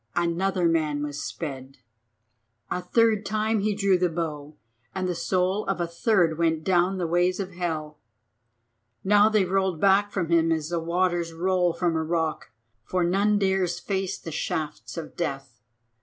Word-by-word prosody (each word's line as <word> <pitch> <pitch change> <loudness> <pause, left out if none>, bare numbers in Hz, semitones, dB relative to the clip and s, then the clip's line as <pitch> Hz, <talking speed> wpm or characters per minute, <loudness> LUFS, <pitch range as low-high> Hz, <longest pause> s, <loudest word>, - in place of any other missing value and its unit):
another 175 +1 +1
man 155 -3 0
was 145 0 -4
sped. 135 -4 -6 0.9
A 180 - -1
third 225 0 +2
time 215 +2 0
he 205 0 0
drew 195 -3 +2
the 180 0 +2
bow 155 -3 -4 0.4
and 185 -1 -1
the 180 - 0
soul 185 +4 0
of 195 -2 -1
a 175 - +1
third 170 -1 +1
went 160 -1 +1
down 185 +1 +2
the 180 - -1
ways 175 +3 +1
of 195 -1 -4
hell. 160 -4 -4 1.0
Now 205 +2 +5
they 215 -3 +2
rolled 190 -2 0
back 200 +2 +3
from 170 -4 -2
him 165 -1 +3
as 160 -1 -1
the 170 -1 -1
waters 170 0 0
roll 180 +1 +1
from 170 -2 0
a 160 - +1
rock, 160 -1 -2 0.3
for 180 +8 -1
none 200 +4 +2
dares 190 -3 +1
face 190 +1 -2
the 165 - -8
shafts 155 +1 -4
of 160 -2 -7
death. 135 -8 -4
175 Hz, 165 wpm, -25 LUFS, 160-190 Hz, 1.0 s, Now